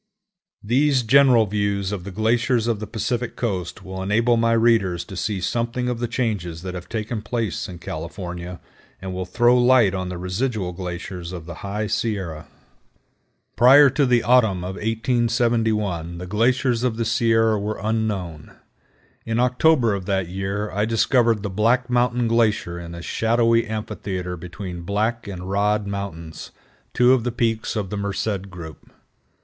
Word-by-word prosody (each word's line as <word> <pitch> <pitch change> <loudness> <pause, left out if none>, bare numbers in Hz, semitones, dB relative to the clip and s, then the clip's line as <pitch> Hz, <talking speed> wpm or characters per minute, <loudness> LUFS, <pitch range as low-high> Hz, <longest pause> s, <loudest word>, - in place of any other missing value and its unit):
These 130 +4 +2
general 125 -1 +5
views 100 -1 -1
of 95 -4 -5
the - - -5
glaciers 115 +4 +1
of 115 -3 0
the 110 - -6
Pacific 120 +1 -3
Coast 95 -8 -3
will 95 0 -6
enable 115 +5 +2
my 115 0 +2
readers 115 -6 +2
to 95 - -9
see 100 +2 -2
something 120 +6 -1
of 120 -2 -3
the 120 - -1
changes 105 -9 -3
that 90 -1 -5
have 90 -1 -8
taken 110 0 -3
place 110 -2 -3
in 90 - -8
California, 85 +2 -6 0.4
and 95 0 -6
will 90 0 -4
throw 120 +6 +3
light 120 -5 +5
on 95 -1 -3
the 90 - -5
residual 95 +2 -2
glaciers 90 -1 -6
of 85 -3 -7
the 85 - -7
High 105 +2 -3
Sierra. 100 -7 -3 1.1
Prior 135 +4 +7
to 140 +1 +2
the 120 -2 +3
autumn 110 -7 +3
of 90 +1 -4
1871 115 -6 0
the 90 - -6
glaciers 120 +4 +1
of 125 -3 0
the 115 - -1
Sierra 115 -1 +2
were 105 +2 -3
unknown. 105 -8 -3 0.7
In 115 +1 -1
October 125 -1 +3
of 95 -2 -4
that 95 -3 0
year 95 +3 -3
I 105 +2 0
discovered 115 -1 +2
the 105 - -2
Black 120 +5 +1
Mountain 120 -1 +2
Glacier 110 -7 +1
in 85 0 -8
a 85 - -8
shadowy 115 +2 +2
amphitheater 95 -4 -4
between 90 +1 -7
Black 110 +5 -1
and 90 -2 -6
Rod 105 +2 +1
Mountains, 100 -5 -6 0.4
two 125 +1 +4
of 125 -3 +2
the 125 - -1
peaks 115 -1 -1
of 100 -4 -3
the 105 - -3
Merced 100 0 -3
group. 85 -4 -10
105 Hz, 160 wpm, -22 LUFS, 95-120 Hz, 1.1 s, Prior